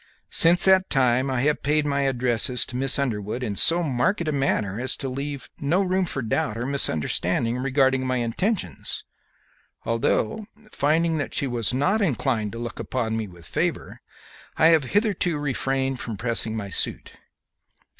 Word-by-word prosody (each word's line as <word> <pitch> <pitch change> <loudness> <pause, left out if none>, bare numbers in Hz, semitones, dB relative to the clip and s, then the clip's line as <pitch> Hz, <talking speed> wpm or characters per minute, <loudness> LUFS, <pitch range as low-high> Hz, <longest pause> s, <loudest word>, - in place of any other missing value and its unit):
Since 175 +2 +5
that 190 0 +5
time 130 0 +2
I 130 -2 0
have 150 +2 +1
paid 150 +1 +1
my 140 -1 0
addresses 125 -1 +1
to 125 - -9
Miss 135 +1 +2
Underwood 120 -3 -2
in 105 -4 -3
so 170 - +3
marked 155 +6 0
a - - +1
manner 115 -8 -1
as 130 +1 -1
to 135 - -4
leave 140 +1 -4
her - - -12
no 180 +6 +3
room 185 0 +1
for 135 -6 -3
doubt 110 0 -1
or 120 - -3
misunderstanding 115 - 0
regarding 135 0 +1
my 130 0 0
intentions, 120 - -2 0.8
although, 115 - 0 0.2
finding 160 +2 +1
that 145 - -4
she - - 0
was 120 -4 -1
not 145 - +1
inclined 125 - 0
to - - -6
look 120 0 -6
upon 115 -3 -2
me 110 -1 -3
with 85 -3 -15
favor, - - -3 0.6
I 160 - +6
have 160 -4 +4
hitherto 200 - 0
refrained 135 -2 -1
from 115 -4 -5
pressing 115 0 0
my 100 -2 -5
suit. - - -1
130 Hz, 165 wpm, -24 LUFS, 115-150 Hz, 0.8 s, I